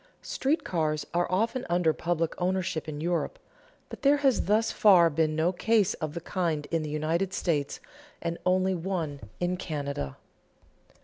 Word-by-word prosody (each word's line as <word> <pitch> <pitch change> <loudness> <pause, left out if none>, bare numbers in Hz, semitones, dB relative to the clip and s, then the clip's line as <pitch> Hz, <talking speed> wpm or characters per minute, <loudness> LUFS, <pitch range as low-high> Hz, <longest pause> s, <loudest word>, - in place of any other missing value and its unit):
Street 285 +5 0
railroads 155 -3 0
are 175 +1 +1
often 230 +7 0
under 175 -2 +3
public 165 -1 -1
ownership 180 -4 -1
in 145 -1 -5
Europe; 175 - -1 0.5
but - - -10
there 285 +1 +5
has 275 -3 +2
thus 220 +3 +2
far 180 -6 +6
been 155 +1 +1
no 160 +3 +2
case 210 +1 +2
of 155 0 -5
the 170 - -4
kind 165 -4 -1
in 165 -1 +1
the 155 - -4
United 165 +6 -1
States, 145 -5 -1 0.4
and 170 0 -3
only 185 +1 +2
one 170 -5 -3 0.2
in 180 +1 0
Canada. 140 - -4
170 Hz, 160 wpm, -28 LUFS, 155-190 Hz, 0.5 s, far